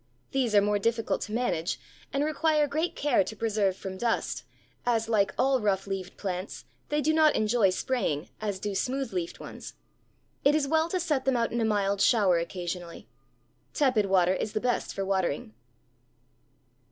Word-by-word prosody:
These 250 -5 +1
are 205 - +7
more 205 0 +1
difficult 230 +2 0
to - - -5
manage, 215 -8 -1 0.3
and 280 +1 0
require 310 0 +2
great 310 +4 -1
care 290 -8 +2
to 220 - -7
preserve 210 -4 0
from 190 -1 -7
dust, 235 -1 -1 0.4
as 225 -2 +1
like 210 -3 +2
all 265 0 +3
rough 195 -2 +1
leaved 195 -2 -5
plants, 185 -1 -5 0.2
they 295 0 +1
do 315 +2 +2
not 315 -1 +5
enjoy 215 -1 +3
spraying, 185 - -1
as 205 -3 -2
do 205 +1 -3
smooth 260 +4 -2
leaved 175 -2 -3
ones. - - -9 0.7
It 285 +2 +5
is 300 -2 +1
well 320 +2 +2
to 370 - 0
set 300 -7 0
them 265 -2 +2
out 230 -1 0
in 235 - -1
a - - +2
mild 200 -2 +1
shower 200 -8 +4
occasionally. 175 0 -5 0.7
Tepid 250 -8 +3
water 185 -1 +4
is 210 +3 -3
the - - 0
best 245 +1 -1
for 195 - -3
watering. 185 - -1
215 Hz, 175 wpm, -28 LUFS, 190-270 Hz, 0.7 s, are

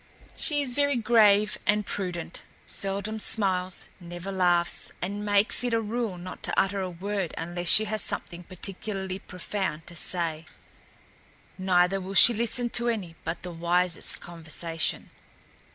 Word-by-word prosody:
She 290 -2 +1
is 255 -3 -1
very 285 +1 +1
grave 215 -3 +4
and 210 0 +2
prudent, 175 -5 -4 0.2
seldom 200 +3 -2
smiles, 185 -4 0
never 175 +2 -7
laughs 175 -2 +1
and 200 +3 -4
makes 205 +3 +3
it 245 -2 +1
a - - +2
rule 225 -3 -3
not 180 +1 -9
to - - 0
utter 195 +1 +1
a 185 - -3
word 190 0 -4
unless 175 +1 -4
she 215 +4 +7
has 215 0 -2
something 175 0 -3
particularly 190 +1 -5
profound 180 -3 -4
to 175 - -8
say. 165 -2 -1 1.1
Neither 185 +1 +2
will 190 +1 -6
she 240 - +9
listen 235 +1 0
to 240 0 +3
any 190 -8 -3
but 165 +1 -4
the 180 - -5
wisest 175 +1 0
conversation." 165 -1 -3
190 Hz, 145 wpm, -27 LUFS, 175-210 Hz, 1.1 s, she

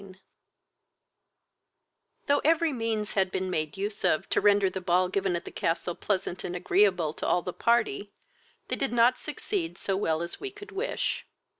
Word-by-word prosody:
I 190 -1 -13 2.1
Though 285 0 +3
every 320 0 +3
means 225 -3 -2
had 190 -2 +2
been 185 0 -2
made 155 -2 -2
use 205 +1 -3
of 155 - +2
to - - +3
render 205 -1 +5
the 190 0 -4
ball 180 +1 +2
given 190 -1 0
at 170 - -4
the - - -7
castle 170 +1 -1
pleasant 190 -1 -2
and 175 - -4
agreeable 180 -3 +2
to - - -4
all 175 - +2
the 180 - -4
party, 230 -5 +1 0.6
they - - -1
did 270 -4 -1
not 240 +2 +4
succeed 355 -6 -3
so 195 - -1
well 165 -4 0
as 170 - -6
we 405 - -4
could 410 +1 -12
wish. 425 +6 -2
195 Hz, 175 wpm, -28 LUFS, 180-235 Hz, 2.1 s, render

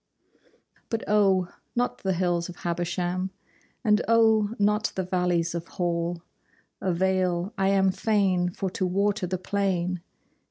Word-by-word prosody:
But 225 -1 -2
oh, 195 -4 +3 0.2
not 245 +1 0
the 190 -1 0
hills 175 -1 0
of 175 - -8
Habersham, 175 +2 -2 0.5
And 210 -2 +4
oh, 220 -1 +4
not 210 +1 +2
the 190 - -1
valleys 180 -2 0
of 170 0 -4
Hall 170 -1 -2 0.6
Avail: 185 +1 0
I 195 0 +1
am 195 -1 +4
fain 190 -3 +1
for 190 +1 -4
to 185 0 -1
water 200 +1 0
the 185 +1 -2
plain. 185 -2 -1
185 Hz, 130 wpm, -26 LUFS, 175-200 Hz, 0.6 s, And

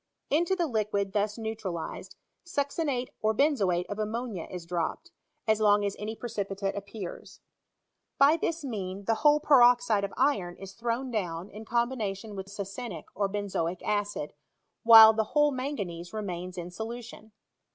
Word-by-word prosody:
Into 345 +6 +2
the 350 -2 0
liquid 210 -6 -1
thus 210 +1 0
neutralized, 215 -7 -5 0.3
succinate 285 -5 -1
or 220 0 +1
benzoate 200 - +2
of 205 - -6
ammonia 215 -3 -3
is 180 -2 -7
dropped, 170 -1 -3 0.4
as 220 0 +3
long 205 -1 +4
as 200 - -2
any 215 +2 -4
precipitate 200 -4 -3
appears. 200 -2 -8 0.8
By 285 +3 +6
this 335 -1 -2
means, 200 -5 -5
the 225 - +3
whole 295 0 +6
peroxide 245 -7 +5
of 200 - -2
iron 205 -10 +1
is 195 0 -9
thrown 235 +4 -2
down 180 -4 -3
in 215 +2 -9
combination 225 -4 -2
with 190 0 -6
succinic, 200 -2 -6
or 200 -1 0
benzoic 185 -4 -2
acid, 205 -7 -2 0.5
while 225 -1 +10
the 220 0 +1
whole 295 0 +5
manganese 200 -11 -4
remains 185 -4 -5
in 175 0 -5
solution. 220 +1 -8
215 Hz, 145 wpm, -28 LUFS, 195-245 Hz, 0.8 s, while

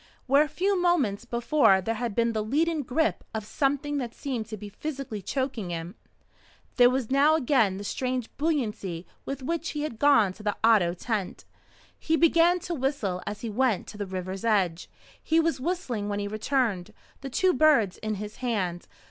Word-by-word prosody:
Where 275 +2 +5
a 305 - +2
few 385 +4 0
moments 270 - +1
before 240 -3 +3
there 225 +5 -2
had 230 -2 -3
been 235 0 +2
the 215 -1 -1
leaden 310 +7 +1
grip 295 +5 0
of 215 -1 -3
something 285 +4 -1
that 240 -3 -5
seemed 250 -6 -4
to 215 -1 -6
be 210 - -8
physically 270 -2 -6
choking 250 -3 -3
him, 170 +1 -5 0.8
there 245 -1 +7
was 255 -2 -2
now 285 +3 +5
again 245 -10 +2
the 200 - -6
strange 255 +2 -2
buoyancy 215 - -2 0.2
with 275 -1 -4
which 335 +4 -2
he 295 - -1
had 235 -8 -5
gone 230 -10 +4
to 215 - -14
the 210 -1 -2
Otto 205 -7 +4
tent. 205 0 -3 0.5
He 320 - +1
began 335 +2 +4
to 350 - -4
whistle 255 - -1
as 210 - -5
he 230 - -4
went 240 -2 +1
to 210 - -10
the 205 - -3
river's 185 +1 -5
edge. 190 -7 +1 0.3
He 320 +1 +2
was 330 -3 +1
whistling 255 - -2
when 205 - -2
he 205 0 -2
returned, 215 -3 -1 0.2
the 275 - -6
two 365 +8 +2
birds 280 - +4
in 215 -1 -2
his 210 +1 -7
hand. 195 -9 -2
235 Hz, 185 wpm, -27 LUFS, 205-285 Hz, 0.8 s, there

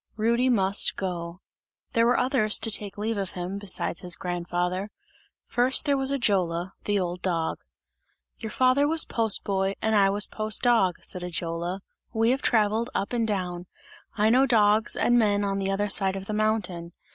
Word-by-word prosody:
Rudy 235 +4 +1
must 195 -4 +2
go. 175 -2 -5 0.5
There 230 0 +3
were 245 - +3
others 250 -5 +3
to 225 - +1
take 205 -1 -1
leave 215 0 -2
of 195 -2 -2
him, 180 +3 -4
besides 190 -4 0
his 180 -1 -5
grandfather; 180 +2 -3 0.6
first 255 +4 +1
there 285 -1 +2
was 270 0 0
Ajola, 190 -9 0
the 205 -1 +1
old 180 -1 -4
dog. 165 -3 -2 0.8
"Your 220 - -5
father 255 +5 +2
was 320 +1 +2
post 225 -3 0
boy 195 0 -1
and 220 0 0
I 195 -1 +4
was 205 +1 +1
post 215 0 -1
dog," 225 -8 +3
said 180 - -2
Ajola. 175 +1 -4 0.3
"We 225 +1 +2
have 270 +2 -1
travelled 220 +1 +1
up 200 +5 -2
and 230 -2 0
down; 180 -4 -3 0.5
I 215 +1 +3
know 260 +3 +4
dogs 215 -2 +3
and 240 0 +3
men 205 -2 +2
on 195 0 -2
the 195 0 -2
other 200 +1 0
side 195 -1 +2
of 195 0 -6
the 215 - -5
mountain. 205 -6 -2
205 Hz, 180 wpm, -25 LUFS, 185-230 Hz, 0.8 s, I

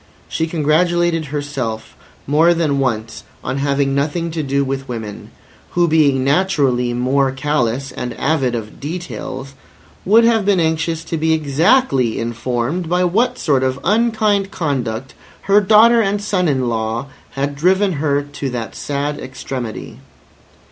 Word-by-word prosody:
She 160 - -2
congratulated 165 +1 +1
herself 140 -6 -4 0.3
more 160 +5 +4
than 150 -4 0
once 115 -4 -2 0.2
on 135 - -2
having 140 0 +1
nothing 155 +4 -1
to 160 0 -2
do 140 -1 0
with 135 0 -4
women, 110 -4 -6 0.5
who 175 0 +4
being 145 -5 +3
naturally 140 -6 +1
more 130 +3 +1
callous 135 -2 -1
and 125 -1 -5
avid 135 -5 +1
of 110 -2 -7
details, 140 -4 -6 0.5
would 220 +4 +5
have 230 -2 +3
been 195 -2 +2
anxious 160 0 0
to 165 0 -3
be 160 +1 +2
exactly 155 - +2
informed 120 +8 -2
by 180 +1 +2
what 230 +8 +1
sort 140 -4 +1
of 130 0 -1
unkind 215 -1 +2
conduct 135 - -3 0.3
her 200 +1 +4
daughter 225 +3 +6
and 205 -1 0
son 200 -3 0
in 130 -4 +1
law 115 +2 -2 0.3
had 140 +1 -2
driven 185 +6 +2
her 145 -2 +1
to 145 -1 -5
that 120 -3 -5
sad 145 +1 -3
extremity. 130 -4 -6
145 Hz, 140 wpm, -18 LUFS, 130-175 Hz, 0.5 s, daughter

